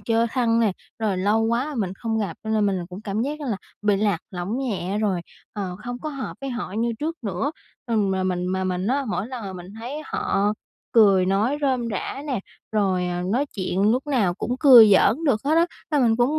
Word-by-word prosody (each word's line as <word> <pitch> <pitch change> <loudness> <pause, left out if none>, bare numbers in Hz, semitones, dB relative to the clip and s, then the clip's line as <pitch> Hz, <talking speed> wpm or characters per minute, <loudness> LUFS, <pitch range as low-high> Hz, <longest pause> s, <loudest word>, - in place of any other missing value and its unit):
chơi 230 0 +1
thân 230 -3 +2
nè, 220 -4 +3 0.3
rồi 210 -4 0
lâu 205 +4 +2
quá 240 +7 0
mình 195 -5 -1
không 225 +2 -2
gặp 200 -6 -2
cho 220 - -3
nên 215 -1 +2
mình 185 -3 -1
cũng 185 +2 -8
cảm 210 +1 -2
giác 295 +4 -3
là 250 -8 -2 0.3
bị 205 -1 +3
lạc 200 -4 +1
lõng 185 +6 -3
nhẹ 205 -7 -2
rồi, 200 -5 0 0.3
ờ, 190 -3 -4
không 245 0 -4
có 310 - -5
hợp 275 -3 -5
với 275 -1 -4
họ 240 -6 -4
như 230 +3 0
trước 325 +2 -3
nữa. 205 +6 -1 0.4
Ừm, 215 -5 +1
mà 190 0 0
mình 180 -1 -1
mà 190 +1 -1
mình 185 0 -1
á 275 +4 +1
mỗi 215 - -2
lần 250 -2 -6
mà 190 - -5
mình 180 -1 -9
thấy 265 +6 -5
họ 205 +1 0 0.4
cười 200 -5 +5
nói 210 +9 +1
rôm 255 -4 0
rả 215 +7 -4
nè, 260 -8 -1 0.3
rồi, 190 -4 +1
à, 175 0 -2
nói 270 +5 +1
chuyện 185 0 -1
lúc 260 +4 -1
nào 220 -11 +1
cũng 245 +6 -3
cười 240 -7 +9
giỡn 230 - +4
được 250 -8 +2
hết 295 +3 +2
á, 335 +1 +4 0.2
là 300 - +2
mình 225 -1 +3
cũng 260 +6 +2
220 Hz, 225 wpm, -24 LUFS, 190-250 Hz, 0.4 s, cười